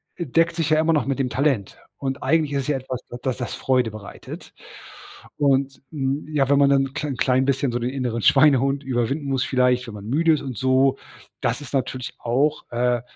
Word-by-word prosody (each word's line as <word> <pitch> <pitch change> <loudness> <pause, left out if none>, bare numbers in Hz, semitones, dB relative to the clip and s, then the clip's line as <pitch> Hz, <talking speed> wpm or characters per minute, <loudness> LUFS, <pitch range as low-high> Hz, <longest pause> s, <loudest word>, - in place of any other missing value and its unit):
äh, 170 - -4
deckt 165 +4 +2
sich 165 -3 -1
ja 155 0 +4
immer 160 +1 +3
noch 150 - +1
mit 135 0 -1
dem 130 -2 0
Talent. 130 -7 0 0.2
Und, 135 0 -4
eigentlich 155 -3 +1
ist 140 - 0
es - - -8
ja 145 -2 +1
etwas, 130 -1 -6 0.2
das 130 -2 -1
das 125 - -4
Freude 125 -3 +1
bereitet. 105 -1 -10 0.8
Und, 140 -1 +1
hm, 140 -1 -2
ja, 145 -3 +1
wenn 140 0 +4
man 140 - +5
dann 135 -1 +2
klein 145 -3 -3
klein 130 0 +2
bisschen 135 -1 0
so 120 - -2
den 120 +1 -1
inneren 125 -4 -2
Schweinehund 135 0 +4
überwinden 130 +3 -1
muss 135 -2 0
vielleicht, 125 -1 +1
wenn 110 - -8
man 100 0 -9
müde 160 +7 +3
ist 150 - -1
und 130 -3 -5
so, 130 +1 +3 0.4
das - - -1
ist 145 - -10
natürlich 130 -2 -2
auch, 140 +6 0
äh, 120 0 +1
135 Hz, 210 wpm, -23 LUFS, 125-145 Hz, 0.8 s, man